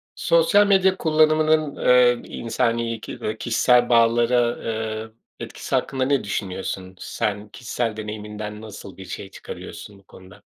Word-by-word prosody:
Sosyal 225 Hz, -, +4 dB
medya 190 Hz, -1 st, +4 dB
kullanımının, 155 Hz, -2 st, +2 dB
eee, 125 Hz, -1 st, +4 dB, 0.2 s
insani 115 Hz, -1 st, -1 dB
ki -, -, -8 dB
eee, 110 Hz, +1 st, -3 dB
kişisel 120 Hz, +1 st, +3 dB
bağlara, 120 Hz, +1 st, +4 dB
ııı, 110 Hz, -1 st, -4 dB, 0.3 s
etkisi -, -, -4 dB
hakkında 130 Hz, -1 st, 0 dB
ne 140 Hz, 0 st, +1 dB
düşünüyorsun? 95 Hz, -1 st, -4 dB
Sen 105 Hz, 0 st, -3 dB
kişisel 115 Hz, -1 st, -3 dB
deneyiminden 105 Hz, 0 st, -6 dB
nasıl 105 Hz, -3 st, -10 dB
bir 95 Hz, -, -9 dB
şey 95 Hz, -, -7 dB
çıkarıyorsun 100 Hz, +1 st, -10 dB
bu -, -, -23 dB
konuda? 95 Hz, -1 st, -16 dB
115 Hz, 130 wpm, -23 LUFS, 105-130 Hz, 0.3 s, Sosyal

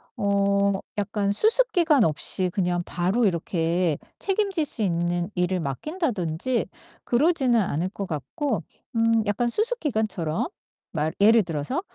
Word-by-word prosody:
어 200 Hz, -2 st, +1 dB, 0.3 s
약간 205 Hz, 0 st, -1 dB
수습 455 Hz, -, +3 dB
기간 320 Hz, -, +4 dB
없이 175 Hz, +4 st, +2 dB
그냥 175 Hz, -2 st, 0 dB
바로 190 Hz, +7 st, 0 dB
이렇게 170 Hz, -2 st, 0 dB, 0.2 s
책임질 390 Hz, -4 st, 0 dB
수 235 Hz, -6 st, 0 dB
있는 175 Hz, 0 st, -1 dB
일을 180 Hz, 0 st, 0 dB
맡긴다든지 220 Hz, -, -2 dB, 0.4 s
그러지는 260 Hz, -2 st, +2 dB
않을 180 Hz, -3 st, -1 dB
것 200 Hz, 0 st, -6 dB
같고 170 Hz, -, -3 dB, 0.3 s
음 225 Hz, 0 st, +2 dB
약간 205 Hz, +4 st, 0 dB
수습 455 Hz, -, +2 dB
기간처럼 215 Hz, -, -1 dB, 0.4 s
말 155 Hz, -1 st, -1 dB
예를 220 Hz, +3 st, +6 dB
들어서 165 Hz, -, -3 dB
200 Hz, 265 characters per minute, -24 LUFS, 175-255 Hz, 0.4 s, 예를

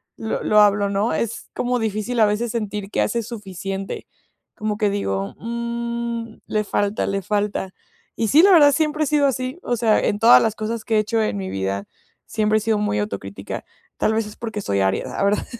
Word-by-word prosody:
lo 220 Hz, -, -3 dB
lo 210 Hz, -, +4 dB
hablo, 205 Hz, -1 st, +4 dB
¿no? 200 Hz, +3 st, 0 dB
Es 230 Hz, -1 st, -3 dB
como 245 Hz, 0 st, 0 dB
difícil 220 Hz, +2 st, -2 dB
a 220 Hz, -, +7 dB
veces 215 Hz, +3 st, 0 dB
sentir 210 Hz, -3 st, -3 dB
que -, -, +1 dB
haces 235 Hz, -2 st, -1 dB
suficiente. 195 Hz, -3 st, -6 dB, 0.5 s
Como 210 Hz, -1 st, -2 dB
que 210 Hz, -2 st, +2 dB
digo: 100 Hz, -, -2 dB
"Mmm, 235 Hz, 0 st, -4 dB
le 215 Hz, 0 st, 0 dB
falta, 205 Hz, 0 st, 0 dB
le 195 Hz, 0 st, -1 dB
falta". 205 Hz, -1 st, -2 dB, 0.4 s
Y 225 Hz, -, 0 dB
sí, 300 Hz, +9 st, +6 dB
la 400 Hz, -, +7 dB
verdad, 295 Hz, -5 st, +7 dB
siempre 305 Hz, +1 st, +1 dB
he -, -, -3 dB
sido 290 Hz, -1 st, +3 dB
así, 255 Hz, +4 st, -2 dB
o 245 Hz, -, 0 dB
sea, 220 Hz, -2 st, +3 dB
en 205 Hz, -, 0 dB
todas 230 Hz, +2 st, +8 dB
las 220 Hz, -1 st, 0 dB
cosas 220 Hz, +1 st, -3 dB
que 225 Hz, -, 0 dB
he -, -, +5 dB
hecho 220 Hz, +1 st, 0 dB
en 155 Hz, -, -1 dB
mi 95 Hz, -1 st, -4 dB
vida, 95 Hz, +1 st, -2 dB, 0.4 s
siempre 215 Hz, 0 st, +1 dB
he 215 Hz, -, -1 dB
sido 220 Hz, -1 st, +1 dB
muy 205 Hz, -, 0 dB
autocrítica. 100 Hz, -1 st, -5 dB, 0.3 s
Tal 220 Hz, -, +1 dB
vez 220 Hz, 0 st, 0 dB
es 210 Hz, -, -10 dB
porque 220 Hz, -3 st, -5 dB
soy 100 Hz, -, 0 dB
Aries, 95 Hz, 0 st, +1 dB
la -, -, -3 dB
verdad. 200 Hz, +1 st, +1 dB
215 Hz, 210 wpm, -22 LUFS, 200-235 Hz, 0.5 s, todas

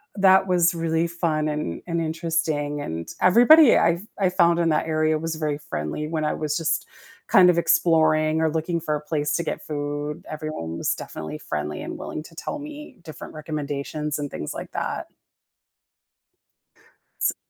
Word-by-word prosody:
that 190 Hz, -1 st, +5 dB
was 175 Hz, -2 st, +3 dB
really 165 Hz, 0 st, 0 dB
fun 165 Hz, -3 st, -1 dB
and 150 Hz, -, -3 dB
and 170 Hz, -1 st, -1 dB
interesting, 160 Hz, -3 st, -1 dB
and 80 Hz, -, -5 dB
everybody 245 Hz, -, +7 dB
I've 170 Hz, +5 st, +1 dB
I 190 Hz, -2 st, +3 dB
found 170 Hz, -2 st, +3 dB
in 170 Hz, -1 st, +2 dB
that 155 Hz, +1 st, +1 dB
area 155 Hz, 0 st, +1 dB
was 165 Hz, 0 st, -3 dB
very 155 Hz, -2 st, -2 dB
friendly 150 Hz, -, -4 dB
when 155 Hz, 0 st, -2 dB
I 150 Hz, -, 0 dB
was 150 Hz, -1 st, -2 dB
just 165 Hz, -2 st, -1 dB, 0.4 s
kind 185 Hz, -5 st, +7 dB
of 175 Hz, -, +3 dB
exploring 155 Hz, -2 st, +3 dB
or 160 Hz, -, +3 dB
looking 165 Hz, +2 st, -1 dB
for 155 Hz, -2 st, -1 dB
a 150 Hz, -, -4 dB
place 150 Hz, -1 st, -1 dB
to 170 Hz, -, 0 dB
get 160 Hz, -, -4 dB
food. 145 Hz, 0 st, -4 dB
Everyone 155 Hz, -, -5 dB
was -, -, 0 dB
definitely 80 Hz, -1 st, -7 dB
friendly 75 Hz, 0 st, -4 dB
and -, -, -6 dB
willing 155 Hz, -, -6 dB
to 165 Hz, -, -15 dB
tell 295 Hz, -, -5 dB
me 300 Hz, -2 st, -9 dB
different 155 Hz, -2 st, -9 dB
recommendations 150 Hz, -1 st, -4 dB
and 145 Hz, -1 st, -4 dB
things 75 Hz, -, -5 dB
like -, -, -7 dB
that. -, -, -3 dB, 2.1 s
S -, -, +2 dB
155 Hz, 170 wpm, -24 LUFS, 150-170 Hz, 2.1 s, everybody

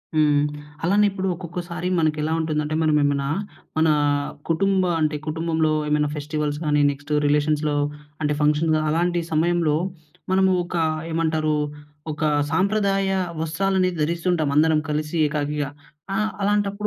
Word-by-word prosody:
హ్మ్. 150 Hz, -2 st, +4 dB, 0.4 s
అలానే 200 Hz, +5 st, +4 dB
ఇప్పుడు 190 Hz, -1 st, -3 dB
ఒక్కొక్కసారి 175 Hz, 0 st, -5 dB
మనకెలా 155 Hz, 0 st, 0 dB
ఉంటుందంటే 155 Hz, -1 st, -1 dB
మనం 155 Hz, -1 st, +3 dB
ఏమైనా, 140 Hz, -1 st, +1 dB, 0.5 s
మన 160 Hz, 0 st, +4 dB, 0.6 s
కుటుంబ 190 Hz, +3 st, +2 dB, 0.2 s
అంటే 155 Hz, -1 st, +1 dB
కుటుంబంలో 160 Hz, 0 st, 0 dB, 0.2 s
ఏమైనా 150 Hz, 0 st, +1 dB
ఫెస్టివల్స్ 150 Hz, 0 st, -2 dB
గానీ 150 Hz, -1 st, +3 dB
నెక్స్టు 145 Hz, +1 st, -6 dB
రిలేషన్స్‌లో 150 Hz, +1 st, +1 dB, 0.5 s
అంటే 150 Hz, -1 st, +1 dB
ఫంక్షన్‌గా 155 Hz, +1 st, +2 dB
అలాంటి 175 Hz, +2 st, +1 dB
సమయంలో 160 Hz, -1 st, +2 dB, 0.6 s
మనము 190 Hz, 0 st, +4 dB
ఒక 175 Hz, -, -6 dB, 0.4 s
ఏమంటారు 160 Hz, -1 st, +1 dB, 0.6 s
ఒక 150 Hz, 0 st, -7 dB, 0.3 s
సాంప్రదాయ 195 Hz, +2 st, +1 dB, 0.3 s
వస్త్రాలను 185 Hz, +3 st, +1 dB
ధరిస్తుంటాం 170 Hz, 0 st, 0 dB
అందరం 155 Hz, +1 st, +4 dB
కలిసి 150 Hz, +2 st, -2 dB
ఏకాకిగా. 145 Hz, -1 st, -2 dB, 0.5 s
ఆ! -, -, 0 dB, 0.2 s
అలాంటప్పుడు 205 Hz, 0 st, +1 dB
155 Hz, 115 wpm, -23 LUFS, 150-175 Hz, 0.6 s, హ్మ్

